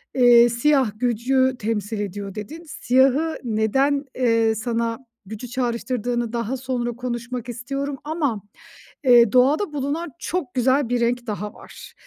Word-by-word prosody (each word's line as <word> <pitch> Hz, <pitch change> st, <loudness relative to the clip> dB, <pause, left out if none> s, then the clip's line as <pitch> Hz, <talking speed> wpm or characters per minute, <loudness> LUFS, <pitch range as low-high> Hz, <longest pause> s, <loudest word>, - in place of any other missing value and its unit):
Eee, 240 Hz, -2 st, +7 dB
"Siyah 255 Hz, 0 st, +2 dB
gücü 255 Hz, +2 st, +1 dB
temsil 210 Hz, 0 st, -2 dB
ediyor." 200 Hz, -1 st, -5 dB
dedin. 220 Hz, +11 st, -7 dB
Siyahı 275 Hz, +2 st, +1 dB
neden, 265 Hz, +6 st, +1 dB
eee, 230 Hz, -3 st, +2 dB
sana 230 Hz, +1 st, -2 dB, 0.3 s
gücü 220 Hz, +4 st, -7 dB
çağrıştırdığını 240 Hz, -1 st, -2 dB
daha 235 Hz, +2 st, -2 dB
sonra 250 Hz, -2 st, -2 dB
konuşmak 245 Hz, 0 st, -5 dB
istiyorum 275 Hz, +4 st, -4 dB
ama, 290 Hz, -9 st, -2 dB, 0.6 s
eee, 240 Hz, -4 st, +6 dB
doğada 290 Hz, +8 st, +3 dB
bulunan 295 Hz, +4 st, -2 dB
çok 315 Hz, -8 st, -3 dB
güzel 260 Hz, +1 st, +2 dB
bir 245 Hz, -1 st, 0 dB
renk 240 Hz, +1 st, 0 dB
daha 210 Hz, 0 st, -4 dB
var, -, -, -13 dB
245 Hz, 130 wpm, -22 LUFS, 230-270 Hz, 0.6 s, Eee